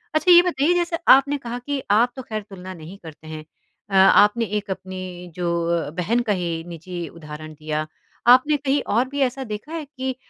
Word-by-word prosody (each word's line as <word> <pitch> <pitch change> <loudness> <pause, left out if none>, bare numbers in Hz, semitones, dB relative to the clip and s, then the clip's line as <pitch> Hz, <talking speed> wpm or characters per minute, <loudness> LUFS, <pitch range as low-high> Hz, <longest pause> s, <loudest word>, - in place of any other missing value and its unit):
अच्छा 360 +3 +4
ये 350 0 +10
बताइए 345 -1 +1
जैसे 345 -1 0
आपने 280 +2 +6
कहा 240 -2 -6
कि 280 +1 -4
आप 235 +4 +4
तो 260 - -6
ख़ैर 215 -3 -5
तुलना 185 -1 -9
नहीं 170 +3 -11
करते 160 0 -12
हैं, 155 -1 -7 0.5
अ, - - -10
आपने 210 +4 +5
एक 210 0 -4
अपनी 185 -1 -7
जो 175 -1 -1
अ, 170 -3 -1
बहन 185 +9 -1
का - - +4
ही 170 -3 -3
निजी 170 0 -7
उदाहरण 155 -1 -10
दिया। 155 0 -4 0.4
आपने 255 +5 +6
कहीं 280 0 0
और 245 +4 +2
भी 285 - -5
ऐसा 265 +1 0
देखा 215 +6 -7
है 320 -3 -4
कि, 265 -2 -5
210 Hz, 200 wpm, -22 LUFS, 170-270 Hz, 0.5 s, ये